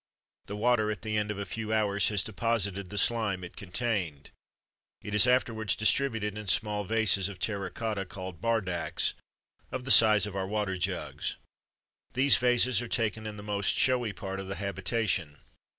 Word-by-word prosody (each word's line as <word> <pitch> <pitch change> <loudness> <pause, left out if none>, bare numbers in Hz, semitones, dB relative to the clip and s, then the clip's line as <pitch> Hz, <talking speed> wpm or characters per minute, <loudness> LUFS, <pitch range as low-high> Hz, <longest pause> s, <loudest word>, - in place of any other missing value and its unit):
The 100 - -5
water 110 0 +2
at 105 0 -4
the 110 -1 -2
end 105 0 0
of 105 - -3
a 100 - -4
few 110 0 -5
hours 100 -2 +2
has 105 -3 +1
deposited 100 -3 -2
the 105 - -6
slime 105 -3 +1
it 85 - -9
contained. 95 - -3 0.7
It 105 - -6
is 105 +3 +6
afterwards 115 -5 +1
distributed 110 -2 +1
in 105 -1 -7
small 105 +1 +2
vases 105 -3 +2
of 100 - -9
terra 100 +1 -3
cotta, 105 -1 -3
called 95 -2 -8
bardaks, 100 -7 0 0.6
of 130 -1 -5
the 135 - +2
size 110 -3 +7
of 105 -2 -7
our 95 -1 -2
water 100 -2 -2
jugs. 90 - -3 0.8
These 135 +3 +4
vases 125 -1 +3
are 120 - -5
taken 110 -1 -1
in 105 -1 -7
the 105 - -9
most 100 -2 0
showy 125 -4 +2
part 95 -1 -6
of 95 - -6
the 95 - -4
habitation. 95 -5 -2
105 Hz, 175 wpm, -29 LUFS, 95-115 Hz, 0.8 s, size